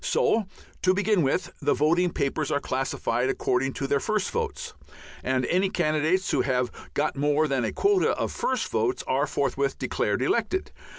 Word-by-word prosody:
So, 220 -3 +2 0.3
to 185 0 +3
begin 205 -1 +2
with, 135 -3 0
the - - +2
voting 170 +5 +2
papers 140 0 -1
are 145 - +2
classified 130 -2 -1
according 135 0 0
to 140 - -3
their 140 +1 +1
first 215 +5 -1
votes, 470 0 -3 0.5
and 130 -1 +1
any 185 +6 +2
candidates 165 +1 +1
who - - +2
have 125 -2 0 0.2
got 150 +1 0
more 145 +2 +2
than 135 -3 0
a 110 - -1
quota 400 -2 +2
of - - -2
first - - -1
votes 375 0 0
are - - +1
forthwith 420 - -1
declared - - -1
elected. 375 - 0
155 Hz, 170 wpm, -26 LUFS, 135-205 Hz, 0.5 s, to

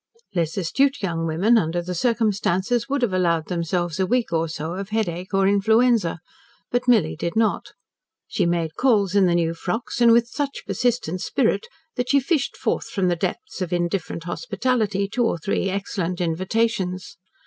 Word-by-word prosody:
Less 165 -2 -1
astute 270 +9 +1
young 165 -3 -1
women, 200 +9 +3
under 165 -1 -1
the 180 +1 -4
circumstances, 220 +2 0
would 280 -2 0
have 215 -6 +1
allowed 170 -3 +1
themselves 175 -1 -1
a 190 - +3
week 240 -5 0
or 165 0 +1
so 160 +1 -4
of 195 +2 -5
headache 190 -4 -2
or 195 -1 +3
influenza, 220 -1 +3 0.5
but 245 +1 0
Milly 225 - +3
did 170 - -3
not. 220 -1 0 0.5
She - - 0
made 170 -2 -1
calls 210 -7 +2
in 200 -2 +4
the 170 - +2
new 165 -1 +1
frocks, 180 +9 -4
and 235 -1 +7
with 235 0 +4
such 280 +2 -4
persistent 235 -8 -1
spirit 470 - 0 0.3
that 245 0 -1
she 280 - +5
fished 275 +1 -1
forth - - -1
from 190 -3 0
the 175 - +1
depths 195 - -4
of 180 -1 -2
indifferent 175 -1 -2
hospitality 215 - -1
two 240 +4 -1
or 225 - +1
three 195 +2 -1
excellent 185 -2 -3
invitations. 185 +2 -1
195 Hz, 170 wpm, -23 LUFS, 175-235 Hz, 0.5 s, and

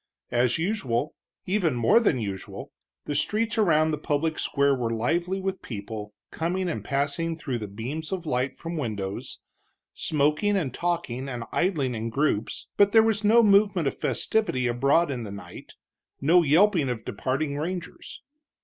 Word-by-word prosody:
As 120 0 +2
usual, 155 - -1 0.3
even 180 -7 +1
more 120 - +4
than 205 - +2
usual, 100 -5 -6 0.3
the 145 - -3
streets 220 +8 0
around 160 -6 +3
the 150 - -2
public 155 +2 -1
square 140 -1 +2
were 125 -3 -1
lively 170 +12 0
with 190 0 -3
people, 105 -1 -7 0.2
coming 180 +3 -1
and 160 - -4
passing 145 +4 -1
through 135 -7 -3
the 105 - -5
beams 130 - -6
of 185 -3 -3
light 130 -2 -1
from 165 0 -6
windows, 105 -8 -4 0.5
smoking 150 +7 +1
and 145 -10 -2
talking 165 -7 -2
and 120 -3 -4
idling 155 -9 0
in 115 0 -3
groups, 115 -4 -1
but 200 0 +4
there 225 -1 +7
was 220 -1 +1
no 230 +3 +6
movement 200 -5 +4
of - - -1
festivity 195 -13 0
abroad 140 +6 +2
in 125 -3 -3
the 110 - -6
night, 100 0 -10 0.4
no 170 +6 +5
yelping 165 -1 +4
of 115 -2 -4
departing 140 +7 -2
rangers. 175 +3 -6
150 Hz, 160 wpm, -26 LUFS, 125-180 Hz, 0.5 s, there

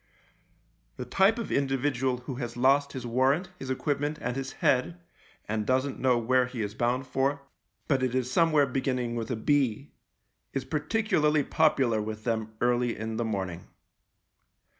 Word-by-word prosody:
The - - -5
type 200 +4 +3
of 230 - -4
individual 135 -2 0
who 130 -2 -5
has 120 -2 -5
lost 140 +3 +3
his 130 -3 -5
warrant, 135 +9 +1
his 135 - -6
equipment, 145 +3 -1
and 125 0 -3
his 135 0 -4
head, 105 -10 +1 0.5
and 110 0 -1
doesn't 130 +4 0
know 125 -2 +3
where 125 +2 +2
he 125 -3 -4
is 105 0 -4
bound 120 +4 0
for, 135 +2 -1 0.4
but 135 -3 +2
it 130 -1 0
is 130 -1 -1
somewhere 155 -1 +4
beginning 130 -3 -1
with 115 -1 -3
a 125 - -1
B, 135 +1 0 0.6
is 135 -1 -2
parti 155 +9 -1
cularly 150 -8 +2
popular 130 -8 +2
with 110 0 -5
them 110 -2 -1
early 120 -1 +1
in 110 0 -4
the 120 - 0
morning. 95 -5 -4
130 Hz, 160 wpm, -28 LUFS, 120-140 Hz, 0.6 s, somewhere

